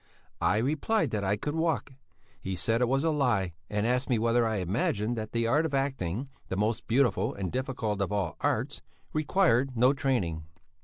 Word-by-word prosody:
I - - +3
replied 155 - +1
that 105 -2 -1
I 100 +2 +1
could 145 +7 -3
walk. 160 -4 -1 0.5
He 95 0 -3
said 115 +7 +1
it 125 - +3
was 135 +2 +1
a 165 - +2
lie 120 - +1 0.2
and 105 +1 0
asked 125 +3 0
me 125 - +3
whether 115 +1 +2
I 110 - -1
imagined 105 +4 0
that 110 -1 -5
the 115 0 0
art 145 +7 +3
of 155 -4 -1
acting, 135 -4 -1 0.2
the 95 - -3
most 105 +2 0
beautiful 120 -1 +2
and 95 -3 -3
difficult 125 -6 -2
of 100 - -1
all 100 -2 -1
arts, - - -1 0.3
required 140 -6 +2
no 125 +4 +5
training. 120 - 0
115 Hz, 190 wpm, -29 LUFS, 105-135 Hz, 0.5 s, no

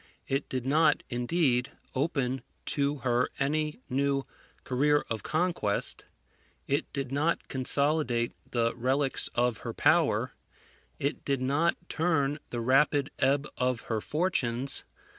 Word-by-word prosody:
It 135 +1 -1
did 130 -1 -3
not, 150 +2 +3
indeed, 125 0 +1 0.2
open 135 -2 0 0.3
to 140 0 +1
her 120 0 +2
any 150 0 -1
new 140 +1 0 0.4
career 145 +3 +2
of 110 - -1
conquest; 160 - -1 0.6
it 140 +1 -1
did 135 -3 -3
not 150 +5 0
consolidate 130 -2 +1 0.2
the 115 -1 +1
relics 135 +3 +1
of 120 -2 +1
her - - -5
power; - - +3 0.6
it 140 +3 -2
did 140 -2 0
not 150 +6 +2
turn 155 -3 +1
the 120 - -3
rapid 135 +3 +3
ebb 140 +2 +2
of 125 -1 +1
her 110 -2 -2
fortunes. 135 - 0
135 Hz, 125 wpm, -29 LUFS, 125-150 Hz, 0.6 s, not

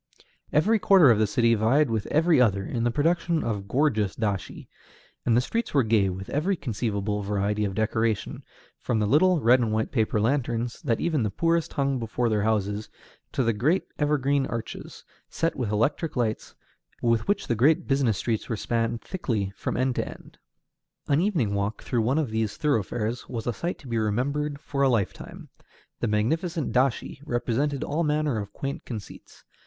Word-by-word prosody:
Every 210 +9 +3
quarter 185 -10 +6
of 110 - +3
the 110 - +3
city 115 +1 +3
vied 120 +5 +3
with 110 -2 -1
every 160 -2 +3
other 100 -5 +2
in 115 +3 -2
the - - +3
production 165 +5 +1
of 105 -4 -3
gorgeous 110 -6 +1
dashi, 100 -6 -3 0.6
and 115 -1 +4
the - - +4
streets 230 - -3
were 135 - +5
gay 110 -3 +2
with 95 +1 -6
every 175 +7 +1
conceivable 105 - -2
variety 105 +1 -1
of 95 -1 -3
decoration, 110 0 -1 0.4
from 120 - -1
the 105 - +1
little 160 - +4
red 125 +1 +5
and 115 -3 0
white 110 0 -1
paper 110 -3 +1
lanterns, 120 0 -1
that 120 -7 0
even 160 -5 0
the 105 - 0
poorest 165 - 0
hung 135 -2 0
before 115 +1 -1
their 105 -2 +1
houses, 105 -1 -1 0.4
to 130 - +1
the 115 -1 +2
great 150 - +1 0.2
evergreen 145 -2 +1
arches, 115 -1 -6 0.3
set 165 +1 -1
with 120 -5 -2
electric 140 +9 0
lights, 115 -4 -2 0.5
with 115 -2 +2
which 205 - +1
the - - 0
great 140 +8 +3
business 135 -7 +2
streets 115 -3 -2
were 115 - -1
spanned 115 +1 -1
thickly 110 - -2
from - - -3
end 130 0 +1
to - - -2
end. - - -13 0.7
An 145 +2 +3
evening 165 - +1
walk 100 +1 -2
through 120 - 0
one 125 +6 +1
of 150 -8 0
these 110 -1 -1
thoroughfares 115 - -1
was 115 -3 -4
a 120 - -1
sight 175 - -3
to 140 - -14
be 115 -2 -1
remembered 140 +7 -1
for 140 -1 -3
a 135 - +5
lifetime. 110 -6 -3 0.5
The 120 - 0
magnificent 160 - 0
dashi 130 +1 0
represented 130 +2 -1
all 160 +4 -1
manner 150 -5 0
of 100 -1 -6
quaint 140 +8 -5
conceits. 110 -5 -9
120 Hz, 180 wpm, -26 LUFS, 110-145 Hz, 0.7 s, quarter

